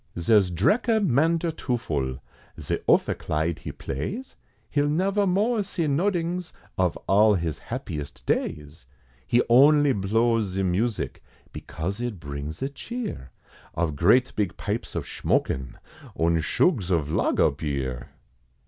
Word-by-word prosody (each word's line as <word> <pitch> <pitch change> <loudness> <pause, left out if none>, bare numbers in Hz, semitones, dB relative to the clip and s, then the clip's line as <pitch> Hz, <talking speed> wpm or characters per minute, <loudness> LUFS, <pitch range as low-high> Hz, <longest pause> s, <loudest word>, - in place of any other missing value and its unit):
Zare's 95 +2 +4
Dreker 220 - +2
Mandertoofel, 135 - 0 0.4
Ze - - -2
opheclide 80 +2 +1
he - - -6
plays, 200 - -5 0.4
He'll 145 0 +2
never 195 +6 +1
more 210 +5 +2
see 180 -3 -2
nodings, 175 +3 -1 0.2
Of 90 -3 +1
all 105 +2 +5
his 85 -4 -2
happiest 70 -3 -6
days; 75 -4 -3 0.4
He 120 - +3
only 145 +3 +6
blows 115 +3 +1
ze 95 +1 0
music, 100 +5 -1 0.3
Because 95 +8 -5
it 120 -6 -3
brings 70 +1 -6
ze 135 - -1
cheer, 210 - -6 0.5
Of 80 -3 -1
great 115 - +3
big 100 -5 -1
pipes - - -4
of - - -2
shmokin', 65 0 -1 0.4
Und 85 0 +2
shugs 95 - +1
of 80 -5 0
Lager 85 - +2
Beer! 70 -4 -4
105 Hz, 120 wpm, -25 LUFS, -, 0.5 s, only